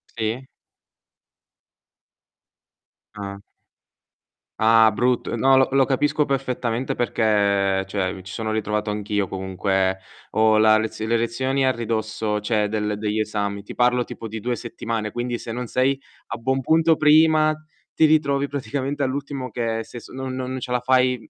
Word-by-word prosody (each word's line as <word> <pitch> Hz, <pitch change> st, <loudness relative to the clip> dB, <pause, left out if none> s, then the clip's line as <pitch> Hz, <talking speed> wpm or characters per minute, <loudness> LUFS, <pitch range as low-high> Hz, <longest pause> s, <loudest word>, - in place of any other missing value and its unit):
Sì. 115 Hz, +4 st, -3 dB, 2.7 s
Ah. 100 Hz, -1 st, -6 dB, 1.2 s
Ah, 110 Hz, 0 st, +6 dB
brutto, 120 Hz, +2 st, 0 dB
no, 135 Hz, +4 st, +4 dB
lo 130 Hz, 0 st, +5 dB
lo 135 Hz, -1 st, +4 dB
capisco 145 Hz, +2 st, +1 dB
perfettamente 130 Hz, -3 st, -2 dB
perché, 100 Hz, -4 st, +1 dB
cioè, 95 Hz, -1 st, -2 dB
mi 95 Hz, -, -9 dB
ci 95 Hz, +1 st, -9 dB
sono 110 Hz, +1 st, -3 dB
ritrovato 105 Hz, 0 st, -1 dB
anch'io 105 Hz, -1 st, -1 dB
comunque. 95 Hz, 0 st, -1 dB, 0.3 s
Ho 110 Hz, 0 st, +4 dB
la 110 Hz, 0 st, +5 dB
lez 110 Hz, 0 st, -4 dB
le 115 Hz, +1 st, +1 dB
lezioni 130 Hz, +4 st, 0 dB
a 130 Hz, -, +4 dB
ridosso, 110 Hz, -2 st, -2 dB
cioè, 105 Hz, 0 st, 0 dB
del 105 Hz, 0 st, -2 dB
degli 105 Hz, +1 st, -2 dB
esami, 100 Hz, -2 st, -2 dB
ti 100 Hz, -, -10 dB
parlo 125 Hz, 0 st, +3 dB
tipo 115 Hz, -, -8 dB
di 110 Hz, +1 st, -6 dB
2 120 Hz, +3 st, -2 dB
settimane, 115 Hz, -2 st, -4 dB
quindi 120 Hz, +1 st, -3 dB
se 115 Hz, -, -7 dB
non 125 Hz, +1 st, -4 dB
sei 130 Hz, +3 st, +1 dB, 0.3 s
a -, -, -5 dB
buon 130 Hz, +3 st, -1 dB
punto 160 Hz, +4 st, +3 dB
prima 155 Hz, 0 st, +5 dB, 0.4 s
ti 160 Hz, -, +4 dB
ritrovi 140 Hz, -3 st, +2 dB
praticamente 140 Hz, +1 st, -3 dB
all'ultimo 135 Hz, -1 st, -3 dB
che 115 Hz, -2 st, -2 dB
se 120 Hz, -, -10 dB
s -, -, -14 dB
non 130 Hz, 0 st, -5 dB
non 130 Hz, 0 st, -4 dB
ce 125 Hz, -, -6 dB
la 125 Hz, -, +2 dB
fai, 125 Hz, -1 st, +1 dB
115 Hz, 150 wpm, -23 LUFS, 105-130 Hz, 2.7 s, Ah